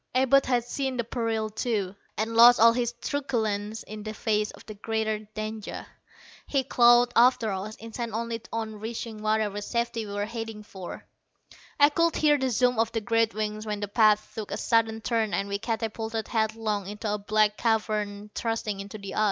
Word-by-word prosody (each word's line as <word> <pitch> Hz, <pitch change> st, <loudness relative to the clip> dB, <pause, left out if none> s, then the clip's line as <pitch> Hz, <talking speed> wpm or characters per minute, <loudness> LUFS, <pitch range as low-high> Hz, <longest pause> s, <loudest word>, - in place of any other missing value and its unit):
Abud 265 Hz, +1 st, +4 dB
had 245 Hz, -2 st, +2 dB
seen 265 Hz, +1 st, -3 dB
the 235 Hz, -, 0 dB
peril, 225 Hz, -2 st, -2 dB
too, 210 Hz, -4 st, -2 dB, 0.2 s
and 220 Hz, +2 st, -2 dB
lost 240 Hz, +1 st, +8 dB
all 230 Hz, +1 st, +7 dB
his 240 Hz, -1 st, 0 dB
truculence 220 Hz, -6 st, -2 dB
in 215 Hz, 0 st, -8 dB
the 215 Hz, +1 st, -6 dB
face 210 Hz, -2 st, 0 dB
of -, -, -13 dB
the 215 Hz, -, -8 dB
greater 220 Hz, +1 st, -2 dB, 0.2 s
danger. 215 Hz, 0 st, -5 dB, 0.6 s
He 275 Hz, -2 st, +1 dB
clawed 240 Hz, -1 st, +5 dB
after 240 Hz, -2 st, +4 dB
us, 195 Hz, +3 st, -4 dB
intent 230 Hz, +1 st, -6 dB
only 230 Hz, 0 st, -3 dB
on 220 Hz, -2 st, -4 dB
reaching 225 Hz, 0 st, -6 dB
whatever 215 Hz, -1 st, 0 dB
safety 235 Hz, 0 st, -2 dB
we 200 Hz, -, -6 dB
were 205 Hz, 0 st, -1 dB
heading 225 Hz, -1 st, -6 dB
for. 190 Hz, -4 st, -9 dB, 0.7 s
I 290 Hz, 0 st, +7 dB
could 335 Hz, +2 st, +1 dB
hear 295 Hz, -1 st, +3 dB
the 265 Hz, 0 st, 0 dB
zoom 245 Hz, 0 st, +2 dB
of 225 Hz, 0 st, +2 dB
the 225 Hz, -, -1 dB
great 230 Hz, 0 st, +1 dB
wings 215 Hz, 0 st, -3 dB
when 210 Hz, -1 st, -2 dB
the 205 Hz, -, -3 dB
path 215 Hz, 0 st, +3 dB
took 215 Hz, -2 st, -6 dB
a -, -, -3 dB
sudden 225 Hz, -1 st, +1 dB
turn 225 Hz, -2 st, 0 dB
and 200 Hz, -, -1 dB
we 200 Hz, 0 st, -2 dB
catapulted 225 Hz, 0 st, -3 dB
headlong 220 Hz, -3 st, -1 dB
into 210 Hz, +1 st, -3 dB
a 210 Hz, -, -2 dB
black 210 Hz, +1 st, +2 dB
cavern 210 Hz, -2 st, -1 dB
thrusting 225 Hz, -3 st, -2 dB
into 200 Hz, +2 st, -7 dB
the 200 Hz, -2 st, -7 dB
ice. -, -, -1 dB
220 Hz, 185 wpm, -27 LUFS, 210-235 Hz, 0.7 s, lost